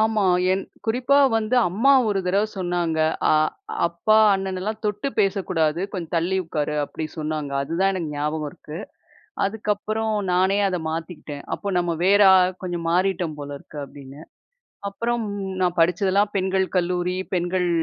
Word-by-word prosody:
ஆமா. 220 Hz, -2 st, +2 dB, 0.3 s
என் 190 Hz, +1 st, 0 dB, 0.2 s
குறிப்பா 250 Hz, +5 st, +3 dB, 0.2 s
வந்து 225 Hz, +2 st, 0 dB
அம்மா 230 Hz, +10 st, +3 dB, 0.2 s
ஒரு 200 Hz, -2 st, +1 dB
தரவை 200 Hz, +4 st, +2 dB
சொன்னாங்க, 175 Hz, -3 st, -1 dB, 0.3 s
"அ -, -, +5 dB, 0.5 s
அப்பா, 170 Hz, +6 st, +2 dB, 0.2 s
அண்ணனலாம் 195 Hz, +3 st, -3 dB
தொட்டு 210 Hz, +5 st, -1 dB
பேசக்கூடாது. 180 Hz, -5 st, +1 dB
கொஞ்சம் 175 Hz, -3 st, -5 dB
தள்ளி 175 Hz, +3 st, +1 dB
உட்காரு." 150 Hz, -2 st, -2 dB
அப்டி 155 Hz, +2 st, -5 dB
சொன்னாங்க. 150 Hz, -2 st, -3 dB
அதுதான் 185 Hz, +6 st, +1 dB
எனக்கு 165 Hz, -5 st, -3 dB
ஞாபகம் 150 Hz, +1 st, -2 dB
இருக்கு. 155 Hz, +3 st, -9 dB, 0.7 s
அதுக்கப்பறம் 215 Hz, +1 st, -1 dB, 0.2 s
நானே 190 Hz, +3 st, +3 dB
அத 180 Hz, -2 st, -2 dB
மாத்திக்கிட்டேன். 160 Hz, -3 st, -6 dB
"அப்போ 200 Hz, -, -8 dB
நம்ம 170 Hz, -1 st, -1 dB
வேற 200 Hz, +2 st, +5 dB
அ -, -, +7 dB, 0.2 s
கொஞ்சம் 175 Hz, -2 st, -3 dB
மாறிட்டோம் 180 Hz, -3 st, 0 dB
போல 145 Hz, 0 st, -6 dB
இருக்கு." 150 Hz, -, -10 dB
அப்டீன்னு. 140 Hz, +1 st, -12 dB, 0.7 s
அப்பறம் 235 Hz, +4 st, -2 dB, 0.4 s
நான் 180 Hz, -1 st, +1 dB
படிச்சதெல்லாம் 190 Hz, +4 st, +2 dB
பெண்கள் 190 Hz, 0 st, +1 dB
கல்லூரி, 180 Hz, 0 st, 0 dB, 0.2 s
பெண்கள் 175 Hz, 0 st, 0 dB
180 Hz, 140 wpm, -23 LUFS, 165-200 Hz, 0.7 s, அ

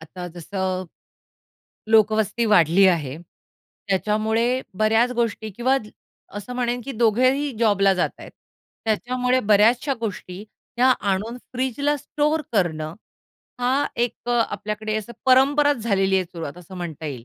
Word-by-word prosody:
आता 180 Hz, +3 st, -9 dB
जसं, 185 Hz, +1 st, -3 dB, 1.1 s
लोकवस्ती 220 Hz, +1 st, +3 dB
वाढली 175 Hz, +1 st, +5 dB
आहे. 150 Hz, -7 st, -1 dB, 0.7 s
त्याच्यामुळे 215 Hz, +3 st, +1 dB, 0.3 s
बऱ्याच 225 Hz, +3 st, +3 dB
गोष्टी 230 Hz, -2 st, -2 dB
किंवा 255 Hz, +3 st, +2 dB, 0.6 s
असं 205 Hz, +4 st, -6 dB
म्हणेन, 245 Hz, 0 st, -1 dB
की 275 Hz, -, -5 dB
दोघेही 255 Hz, +5 st, +2 dB
जॉबला 200 Hz, -4 st, +3 dB
जात 180 Hz, -, 0 dB
आहेत. -, -, -10 dB, 0.5 s
त्याच्यामुळे 250 Hz, +3 st, 0 dB
बऱ्याचश्या 235 Hz, +7 st, +4 dB
गोष्टी 200 Hz, -3 st, -5 dB, 0.3 s
त्या 245 Hz, +2 st, +4 dB, 0.2 s
आणून 210 Hz, +5 st, -2 dB, 0.2 s
फ्रिजला 265 Hz, +3 st, 0 dB
स्टोअर 300 Hz, +3 st, -1 dB
करणं, 160 Hz, -6 st, -1 dB, 0.7 s
हा 260 Hz, +4 st, +2 dB
एक 240 Hz, -1 st, 0 dB
अ, -, -, +1 dB, 0.2 s
आपल्याकडे 215 Hz, +1 st, -4 dB
असं 215 Hz, +2 st, -5 dB
परंपराच 285 Hz, +3 st, +4 dB
झालेली 195 Hz, -4 st, +1 dB
आहे. 185 Hz, -, +1 dB
सुरुवात 165 Hz, -2 st, -8 dB
असं 180 Hz, +2 st, -12 dB
म्हणता 165 Hz, -3 st, -6 dB
येईल. 130 Hz, -6 st, -6 dB
215 Hz, 125 wpm, -23 LUFS, 190-245 Hz, 1.1 s, वाढली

